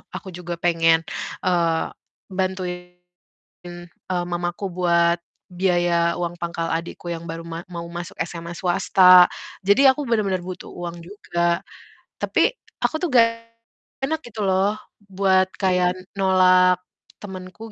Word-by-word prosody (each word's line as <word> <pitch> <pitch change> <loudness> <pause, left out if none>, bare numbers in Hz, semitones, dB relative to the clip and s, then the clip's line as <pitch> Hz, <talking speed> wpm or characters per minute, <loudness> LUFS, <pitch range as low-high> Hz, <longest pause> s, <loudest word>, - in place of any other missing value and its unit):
aku 190 - -7
juga 175 0 -5
pengen, 165 -1 +3 0.4
eee, 170 -3 +1 0.4
bantuin, 180 -1 -5 0.8
eee, 175 -1 0
mamaku 175 +2 -3
buat 170 -1 +2 0.3
biaya 175 -2 +1
uang 175 -1 -2
pangkal 170 -1 -2
adikku 170 +1 -6
yang 165 -1 -6
baru 165 0 -6
ma 165 0 -6
mau 170 -1 -6
masuk 175 +3 -7
SMA 170 0 -8
swasta. 180 0 +6 0.4
Jadi 200 +8 +5
aku 265 +3 -1
benar-benar 200 -6 0
butuh 185 0 -7
uang 175 -1 -6
juga. 170 -2 -1 0.6
Tapi - - +2 0.3
aku - - +1
tuh 360 - 0
nggak 230 -2 +7 0.8
enak 320 +3 -1
gitu 220 -2 -7
loh 190 +2 +2 0.4
buat 190 -1 +3
kayak 180 -2 +2 0.2
nolak 185 -1 +5 0.4
temenku 190 +3 -9
180 Hz, 120 wpm, -22 LUFS, 170-190 Hz, 0.8 s, nggak